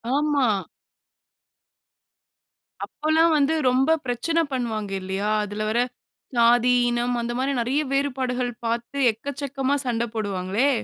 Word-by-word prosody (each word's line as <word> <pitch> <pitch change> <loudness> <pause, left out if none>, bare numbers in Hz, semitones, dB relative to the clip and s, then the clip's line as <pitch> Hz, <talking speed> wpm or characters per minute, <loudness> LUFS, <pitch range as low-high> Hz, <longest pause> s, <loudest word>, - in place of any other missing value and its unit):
ஆமா. 290 -2 +2 2.4
அப்பல்லாம் 320 +2 +2
வந்து 290 +2 +2 0.2
ரொம்ப 260 +4 +2
பிரச்சன 255 +7 0
பண்ணுவாங்கில்லையா? 205 -4 -2
அதில 210 +1 -4
வர 230 +2 +1 0.6
ஜாதி, 240 +1 +5 0.2
இனம் 240 +1 0
அந்த 235 0 -3
மாதிரி 270 +2 0
நெறைய 260 +6 +1
வேறுபாடுகள் 255 -3 -1
பார்த்து 235 +4 -3
எக்கச்சக்கமா 275 +3 -3
சண்ட 235 -2 0
போடுவாங்களே! 200 +4 0
245 Hz, 100 wpm, -24 LUFS, 225-280 Hz, 2.4 s, ஜாதி